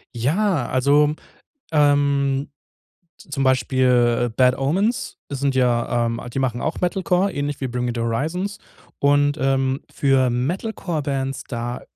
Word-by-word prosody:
Ja, 150 - +1
also, 145 +3 +3 0.6
ähm, 140 -2 +2 0.7
zum 145 -3 -4
Beispiel, 125 -1 +2
äh, - - -8
Bad 125 +1 +4
Omens, 190 - 0
sind 140 -1 -1
ja, 120 -2 +1
ähm 115 0 -3
die - - -3
machen 125 -3 -1
auch 160 - -3
Metal 185 +2 -1
Core 185 +2 +1
ähnlich 145 -1 -3
wie 135 - -2
Bring 125 0 -3
Me 120 - -1
The 120 - -3
Horizon. 150 - -1 0.5
Und, 145 0 +3
ähm, 135 0 +1
für 135 -2 +2
Metal-Core-Bands, 140 - -2
da 120 0 -4
135 Hz, 135 wpm, -22 LUFS, 125-145 Hz, 0.7 s, Bad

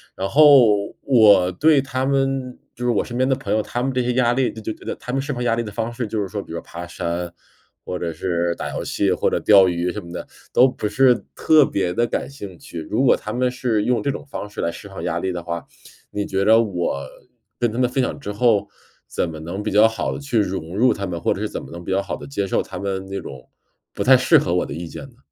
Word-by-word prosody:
然 95 - -2
后 125 -8 +5
我 105 -8 +5
对 145 - +4
他 130 -1 -2
们 135 -2 0 0.2
就 120 - -7
是 - - +3
我 - - 0
身 120 0 -6
边 130 +1 +2
的 135 - +3
朋 135 - -3
友， 110 - +2
他 120 +3 -3
们 135 0 -1
这 125 - +1
些 125 0 0
压 120 -1 +3
力， 130 0 +1
就 110 - -10
就 110 - -3
觉 - - -17
得 - - -4
他 125 - -7
们 135 - +1
释 145 +2 -4
放 125 -2 -3
压 115 - +2
力 115 - 0
的 110 -3 -6
方 115 +2 -3
式， 120 -1 -3
就 110 +1 -3
是 100 - -1
说 100 +1 -4
比 - - -13
如 85 - -4
说 - - -5
爬 85 +1 -8
山， 85 0 -4 0.5
或 90 - -4
者 85 -1 -3
是 85 0 -1
打 - - -5
游 - - -2
戏 100 -2 0
或 90 - +1
者 - - 0
钓 100 -3 +6
鱼 90 0 -1
什 - - -5
么 85 - -11
的， - - -6 0.3
都 130 - +6
不 110 - -3
是 125 +4 +4 0.2
特 155 -3 +5
别 90 -3 -1
地 120 +4 +1
感 - - -3
兴 100 -10 -9
趣。 85 - -9
如 120 +5 +1
果 130 - +6
他 - - -6
们 125 0 +1
是 120 -4 0
用 125 +2 +1
这 145 - -1
种 140 - -4
方 120 -7 -7
式 105 - -6
来 85 - 0
释 100 - -10
放 95 - -8
压 85 - -1
力 95 +1 -2
的 85 -1 -5
话， 85 -1 -5 0.5
你 100 0 -2
觉 95 0 -1
着 110 +1 +6
我 90 -9 -2 0.6
跟 120 - +2
他 115 - -5
们 125 -1 +2
分 130 +1 0
享 - - -2
之 105 - -5
后， 105 -2 +2 0.4
怎 85 - -2
么 80 - -7
能 85 +5 -5
比 - - -2
较 105 +2 +6
好 110 0 -1
地 - - -5
去 125 -5 0
融 90 -2 -3
入 125 +2 +4
他 100 - -4
们， 85 -2 -4
或 - - +1
者 - - -6
是 - - -2
怎 - - -5
么 - - -11
能 85 0 -8
比 95 - -5
较 95 +1 +2
好 95 -3 -4
地 - - -10
接 100 -8 -3
受 - - +1
他 90 -1 -8
们 95 -1 -3
那 100 0 -3
种， 65 -2 -10 0.4
不 - - -5
太 130 +1 +7
适 130 +6 +5
合 90 -10 0
我 90 - +1
的 - - -7
意 85 +3 -6
见 - - -8
呢？ 120 - -23
105 Hz, 305 characters per minute, -21 LUFS, 90-125 Hz, 0.6 s, 太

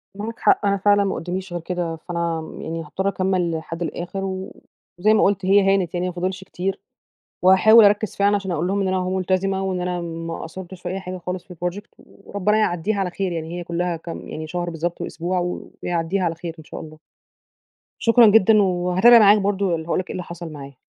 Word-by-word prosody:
معاك 220 +3 -6
حق - - +3
أنا 200 0 +2
فعلًا 205 +1 +3
ما 195 - -1
قداميش 180 +1 -5
غير 175 - -3
كده 175 -1 -3
فأنا 165 -1 -3
يعني 165 +1 -4
هأضطر 190 +5 -3
أكمل 185 -3 0
لحد 165 +1 -7
الآخر، 175 +3 -4
و 190 0 -5 0.4
وزي 215 +4 +4
ما 220 - +4
قُلت 195 -1 +1
هي 195 0 +5
هانت، 185 -3 -1
يعني 180 +1 -1
ما 180 - -4
فاضلش 185 +2 -3
كتير، 190 +1 -4 0.6
وهاحاول 210 +5 +7
أركز 205 +1 +2
فعلًا 200 +1 +3
عشان 195 -2 -4
أقول 165 +1 -1
لهم 200 +1 0
إن 195 - 0
أنا 190 - 0
أهو 185 0 -1
ملتزمة، 190 +1 0
وإن 185 -1 -2
أنا 180 0 -2
ما 165 -1 -5
قصّرتش 180 +1 -9
في - - -4
أي 190 +2 -3
حاجة 185 -1 -6
خالص 180 +1 -5
في 180 - -12
الproject 180 +4 -5
وربنا 200 +1 -2
يعديها 205 0 0
على 185 -2 -1
خير 185 0 -3
يعني، 165 +1 -5
هي 175 - -5
كلّها 170 0 -2
كام 165 +1 -8
يعني 155 0 -6
شهر 175 +2 -3
بالضبط 170 +1 -4
وأسبوع 175 +2 -2 0.4
ويعديها 175 +2 -1
على 165 -1 0
خير 165 0 -7
إن 160 - -12
شاء - - -8
الله. 155 -1 -11 1.0
شكرًا 230 0 +6
جدًا، 215 0 +6
وهاتابع 185 +5 +5
معاك 210 -1 +7
برضو 195 -3 0
ال 160 - -4
هاقول 170 - 0
لك 185 - -4
إيه - - -3
اللي 180 - -4
حصل 170 -1 -8
معايا. 140 -2 -10
185 Hz, 215 wpm, -22 LUFS, 170-195 Hz, 1.0 s, وهاحاول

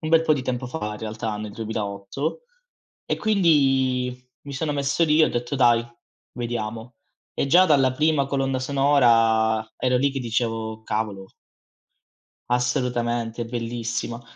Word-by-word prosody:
un 155 - -4
bel 165 -1 +6
po' 155 -2 +3
di 135 - -3
tempo 125 0 -3
fa, 105 -6 -4
in 105 - -8
realtà, 110 0 -4
nel 105 -1 -6
2008 110 - -4 0.6
e - - -1
quindi 135 -10 +2 0.2
mi 140 -1 -8
sono 150 +2 -2
messo 140 +4 +1
lì 155 0 +4
e - - +7
ho - - -1
detto: 120 +3 -3
"Dai, 120 -3 +4 0.5
vediamo." 115 0 -5 0.4
E - - -1
già 175 +6 +6
dalla 135 -6 +4
prima 150 0 +1
colonna 135 -1 -1
sonora 115 -5 +3
ero 125 -1 +1
lì 140 +2 +1
che 135 - -4
dicevo: 115 -2 -2
"Cavolo." 105 -3 -4 1.2
Assolutamente, 120 -2 -1
è - - -3
bellissima. 115 0 -4
125 Hz, 145 wpm, -24 LUFS, 115-140 Hz, 1.2 s, e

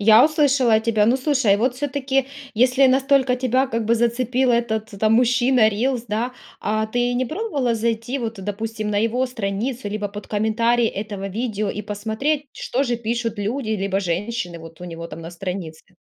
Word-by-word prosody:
Я 220 +3 +7
услышала 280 -7 +3
тебя. 220 -1 +2
Ну 245 - +4
слушай, 260 -7 +2
вот 245 +4 +1
всё-таки, 270 -1 -1 0.3
если 255 +4 +4
настолько 265 0 +3
тебя 255 +1 +1
как 230 -3 -2
бы 230 +2 +3
зацепил 245 +2 +1
этот 225 -2 0
там 220 0 +4
мужчина, 245 -1 +4
рилс, 235 +3 -1
да, 225 +4 -2 0.3
а 215 +1 0
ты 245 +2 0
не 255 +1 +1
пробовала 290 - -1
зайти 230 +3 -1
вот 230 -3 -3
допустим 215 +2 -4
на 205 - +1
его 230 +4 +1
страницу, 230 0 -3
либо 205 0 -3
под 205 +1 -9
комментарии 230 +3 +2
этого 205 -2 -4
видео 215 0 -2
и 210 +2 -4
посмотреть, 220 +9 -2
что 265 +3 -1
же 240 -2 0
пишут 230 -1 -2
люди, 220 +3 -2
либо 195 -2 0
женщины 180 0 -3
вот 165 0 -12
у - - -7
него 170 -1 -7
там 155 - -8
на 165 0 -8
странице? 180 -1 -7
230 Hz, 175 wpm, -22 LUFS, 210-255 Hz, 0.3 s, Я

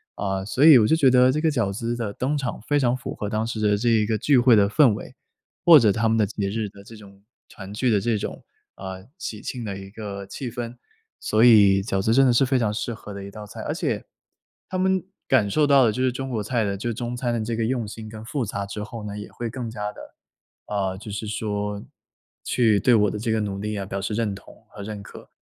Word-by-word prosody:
呃， 95 -1 -2
所 130 +7 +2
以 155 -5 +10
我 105 - +4
就 160 - +4
觉 135 -5 +5
得， 125 0 +5
这 150 - -1
个 160 0 +2
饺 115 -9 0
子 115 +4 -3
的 115 -4 -3
登 140 +7 -2
场 130 -3 -3
非 145 - +2
常 125 -2 +2
符 - - -6
合 105 - -4
当 110 +1 -1
时 110 -2 -4
的 105 -1 +2
这 120 +3 -2
一 110 -2 +3
个 110 0 0
聚 140 +4 +3
会 120 -1 +5
的 100 -1 +4
氛 120 +1 +4
围。 - - -8 0.5
或 165 -3 +10
者 110 -6 +5
他 115 +2 +1
们 115 - +2
的 110 - +3
节 100 -1 -3
日 110 0 -2
的 100 0 -15
这 115 +2 -13
种 100 -2 -15 0.3
团 95 -1 -11
聚 120 +3 0
的 100 -2 +2
这 115 0 0
种， - - -6 0.3
呃， 95 0 -8
喜 110 - -5
庆 125 -3 -5
的 100 -2 -5
一 95 0 -9
个 100 -2 -7
气 120 +6 -6
氛。 120 0 -6 0.4
所 110 +2 +2
以 100 -4 +6
饺 95 -2 -1
子 110 - +1
真 135 +2 +5
的 125 - +4
是 125 - +4
非 130 0 +1
常 110 -3 0
适 120 - -3
合 105 -2 -10
的 100 0 -7
一 100 - -8
道 105 +1 -9
菜。 - - -9
而 - - -3
且， - - -2 0.6
他 185 - -4
们 190 -1 +1 0.2
感 120 -6 +3
受 150 +6 +2
到 135 -3 +6
的， 110 - +3
就 130 - -3
是 130 -1 +2
中 135 +2 -5
国 110 -4 -2
菜 115 +1 -1
的 100 -1 -1
就 115 +4 -3
中 120 +2 -4
餐 120 -1 -2
的 115 -2 -1
这 115 0 -2
个 115 - -1
用 120 -3 -1
心 110 +1 -8
跟 110 0 -9
复 130 +2 -2
杂 100 0 -4
之 100 +1 -6
后 110 -1 -8
呢， 105 0 -6
也 105 - -9
会 120 - -5
更 120 -1 -5
加 105 -2 -4
的， - - -13 0.7
呃 95 -2 -2
就 105 +1 -9
是 105 +1 -5
说 105 -1 -3 0.6
去 110 -5 +2
对 120 +3 +4
我 105 -2 +3
的 105 - -5
这 115 0 -2
个 110 - +1
努 100 -1 -3
力 105 0 -3
啊， 95 - -4
表 100 0 -4
示 105 +2 -3
认 110 -3 -1
同 - - -14
和 105 - -11
认 105 0 -6
可， - - -13
110 Hz, 285 characters per minute, -24 LUFS, 100-120 Hz, 0.7 s, 以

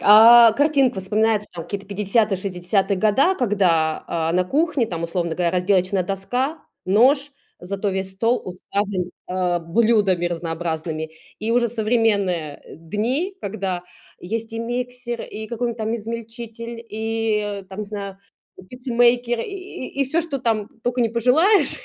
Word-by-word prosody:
А, 230 +2 +9
картинка 275 -5 +2
вспоминается: 210 +2 +1
там 165 -2 -6
какие-то 200 -1 -6
50-е, 205 +1 +1
60-е 190 +1 0
года, 240 - +3
когда, 180 -9 +1
а, 165 -1 -1
на 180 +1 +2
кухне 285 - +1
там, 170 -5 -5
условно 170 -1 -2
говоря, 175 0 +1
разделочная 185 +1 +1
доска, 245 - -2 0.3
нож, 270 +9 +3 0.3
зато 195 +3 -3
весь 190 0 -2
стол 230 +6 +1
уставлен, 185 0 -3 0.2
э, 180 -1 0
блюдами 195 0 +2
разнообразными. 165 -2 -3 0.3
И 220 +2 -3
уже 240 0 +3
современные, 210 -9 0
э, - - -12
дни, 230 - -2
когда 190 -3 -3 0.4
есть 225 +4 -4
и 225 - -4
миксер, 245 0 -4
и 220 +1 -7
какой-нибудь 235 0 -3
там 220 +1 -1
измельчитель, 230 +1 -7
и 215 -2 -2
там, 190 - -9
не - - -3
знаю, 200 -2 -6 0.5
пиццемейкер, 245 -1 +2
и 375 - -6
и - - +4
всё, 315 +6 0
что 325 -5 -3
там 225 -4 0
только 245 +1 -1
не 235 - +3
пожелаешь, 255 - +3
215 Hz, 140 wpm, -22 LUFS, 185-240 Hz, 0.5 s, А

